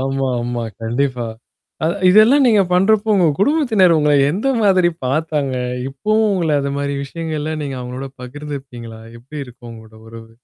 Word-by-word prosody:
ஆமா, 135 Hz, 0 st, -1 dB
ஆமா. 120 Hz, -1 st, -3 dB, 0.2 s
கண்டிப்பா. 120 Hz, +1 st, -1 dB, 0.6 s
அதா 165 Hz, -, +1 dB, 0.2 s
இதெல்லாம் 225 Hz, +8 st, +6 dB
நீங்கப் 205 Hz, -6 st, +3 dB
பண்றப்போ, 205 Hz, +4 st, +3 dB
உங்க 180 Hz, -3 st, +3 dB
குடும்பத்தினர் 220 Hz, -, +3 dB
உங்கள 150 Hz, -1 st, +2 dB, 0.2 s
எந்த 205 Hz, -, -1 dB
மாதிரி 185 Hz, -4 st, +4 dB, 0.2 s
பாத்தாங்க? 145 Hz, -1 st, -1 dB, 0.3 s
இப்பவும் 215 Hz, +11 st, 0 dB
உங்கள 170 Hz, -4 st, 0 dB
அந்த 140 Hz, 0 st, -3 dB
மாரி 140 Hz, 0 st, -2 dB
விஷயங்கள் 160 Hz, +2 st, -5 dB
எல்லாம் 155 Hz, +1 st, -3 dB
நீங்க 135 Hz, -2 st, -5 dB
அவங்களோட 125 Hz, +2 st, -6 dB
பகிர்ந்துக்குவீங்களா? 125 Hz, -4 st, -8 dB, 0.2 s
எப்டி 135 Hz, +6 st, -10 dB
இருக்கும் 120 Hz, -1 st, -13 dB
உங்களோட 110 Hz, -1 st, -14 dB
உறவு? 115 Hz, 0 st, -12 dB
145 Hz, 150 wpm, -18 LUFS, 125-185 Hz, 0.6 s, இதெல்லாம்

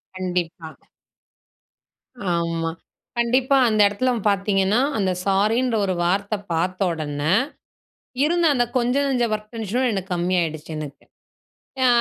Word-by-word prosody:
கண்டிப்பா. 175 Hz, -3 st, -3 dB, 1.7 s
ஆமா. 165 Hz, -1 st, -1 dB, 0.5 s
கண்டிப்பா, 255 Hz, +3 st, +3 dB
அந்த 215 Hz, -1 st, +3 dB
இடத்துல 250 Hz, +6 st, 0 dB, 0.2 s
பாத்தீங்கன்னா, 195 Hz, +2 st, +2 dB, 0.2 s
அந்த 190 Hz, -3 st, +1 dB
சாரின்ற 220 Hz, +5 st, +2 dB
ஒரு 185 Hz, -, 0 dB
வார்த்த 200 Hz, +4 st, 0 dB, 0.2 s
பார்த்தொடன, 165 Hz, -4 st, -1 dB, 1.0 s
இருந்த 340 Hz, +1 st, +2 dB
அந்த 245 Hz, -1 st, +3 dB
கொஞ்சனஞ்ச 250 Hz, 0 st, +1 dB
ஒர்க் 210 Hz, 0 st, -6 dB
டென்ஷனும் 230 Hz, +4 st, -1 dB
எனக்கு 190 Hz, -1 st, -4 dB
கம்மி 175 Hz, +2 st, 0 dB
ஆயிடுச்சு 160 Hz, -1 st, -4 dB
எனக்கு. 145 Hz, -2 st, -8 dB, 0.8 s
அ -, -, +5 dB
195 Hz, 105 wpm, -22 LUFS, 175-240 Hz, 1.7 s, அ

